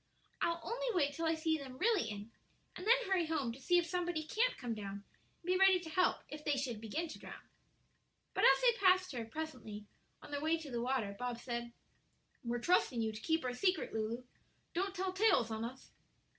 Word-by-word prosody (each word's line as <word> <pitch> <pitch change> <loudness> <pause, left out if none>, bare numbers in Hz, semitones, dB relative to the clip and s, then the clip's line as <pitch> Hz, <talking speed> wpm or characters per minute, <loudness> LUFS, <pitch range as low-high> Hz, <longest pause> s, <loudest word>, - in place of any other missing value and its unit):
"I'll 335 0 +1
only - - -3
wait 290 -5 +2
till 330 +2 -1
I 325 - +2
see 320 0 0
them 260 -2 -8
really 420 - +2
in, 210 +1 -7 0.4
and 365 - -6
then 470 - +8
hurry 375 -4 +1
home 285 -7 0
to 245 - -10
see 355 +6 +3
if 350 - +3
somebody 350 -2 -1
can't 460 +10 +1
come 245 -3 -3
down 200 -2 -5
and 330 - -31
be 365 +1 +2
ready 385 -1 +7
to 340 -2 -8
help 365 +3 +2
if 300 0 -8
they 290 -2 +1
should 245 -5 -2
begin 300 +10 -2
to - - -8
drown." - - -10 0.9
But - - 0
as - - +7
they 485 -1 +4
passed 370 0 +5
her, 240 -4 -3
presently, 225 -6 -6 0.4
on - - -11
their 285 0 -2
way 320 +2 +2
to 310 -4 -8
the 235 -1 -1
water, 240 -5 -1
Bob 245 -1 -2
said: 235 -1 -4 0.7
"We're 240 0 -1
trusting 260 -2 +2
you 220 -1 0
to 215 0 -8
keep 320 0 +1
our 250 - -1
secret, 365 +8 +1
Lulu; 225 +3 -2 0.5
don't 385 +3 -1
tell 375 0 -1
tales 375 - +3
on 220 0 -2
us." 250 +3 -7
305 Hz, 210 wpm, -35 LUFS, 235-360 Hz, 0.9 s, then